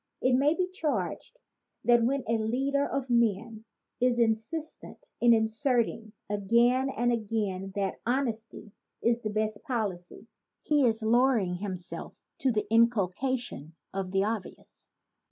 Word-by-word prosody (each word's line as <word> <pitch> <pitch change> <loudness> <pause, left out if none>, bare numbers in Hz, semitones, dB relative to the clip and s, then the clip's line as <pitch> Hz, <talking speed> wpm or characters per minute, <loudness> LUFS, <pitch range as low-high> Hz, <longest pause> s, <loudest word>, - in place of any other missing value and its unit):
It 255 - +2
may 285 +5 +3
be 365 0 0
charged 315 - -3 0.4
that 240 -1 +4
when 265 +2 +1
a 230 0 +1
leader 270 +6 0
of 270 -2 -3
men 225 -1 0 0.3
is 250 -1 +2
insistent 235 +8 -2
in 240 - +6
asserting 225 -1 +1
again 235 +6 +2
and 240 -2 0
again 205 -4 -2
that 195 -2 -2
honesty 230 -4 -3 0.3
is 235 0 +2
the 220 -3 -4
best 215 0 -2
policy, 210 - -4 0.4
he 295 -3 +3
is 225 -1 +1
low 240 +4 +4
ering 180 -5 -1
himself 185 -3 -5 0.2
to 265 - +2
the 215 -2 0
inculcation 230 - +1 0.2
of 190 -1 -3
the 195 +1 +1
obvious. 215 -2 -6
230 Hz, 135 wpm, -28 LUFS, 210-255 Hz, 0.4 s, in